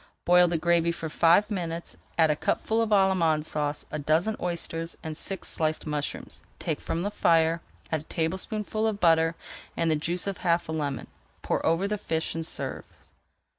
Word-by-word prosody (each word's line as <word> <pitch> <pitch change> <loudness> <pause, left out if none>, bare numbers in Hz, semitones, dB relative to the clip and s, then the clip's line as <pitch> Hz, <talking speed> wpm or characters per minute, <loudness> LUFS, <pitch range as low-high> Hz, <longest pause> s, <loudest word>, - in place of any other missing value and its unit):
Boil 180 0 +6
the 170 -1 0
gravy 170 0 +2
for 165 -1 -5
five 175 +7 +4
minutes, 170 -3 -3
[Page - - -22 0.2
390] 165 - +4
add 160 - +4
a - - +1
cupful 220 +8 0
of 225 - 0
Allemande 185 -6 +3
Sauce, 145 -1 -2
a 150 - -3
dozen 160 +9 +2
oysters, 165 -1 -3
and 155 -1 -4
six 190 +4 -3
sliced 155 -1 0
mushrooms. 150 -1 -4 0.2
Take - - -3
from 170 - -2
the 205 - -1
fire, 165 -2 +3 0.3
add 160 - +1
a - - -17
tablespoonful 205 +7 -1
of 210 -2 -2
butter 165 -2 +4 0.4
and 165 -1 +2
the - - +3
juice 170 +4 -2
of 200 -2 -3
half 170 -1 +1
a - - -4
lemon, 145 -4 -2 0.4
pour - - 0
over 165 +4 +2
the 210 0 -2
fish, 160 -5 -1
and 165 - -3
serve. - - -5
165 Hz, 190 wpm, -27 LUFS, 160-185 Hz, 0.4 s, Boil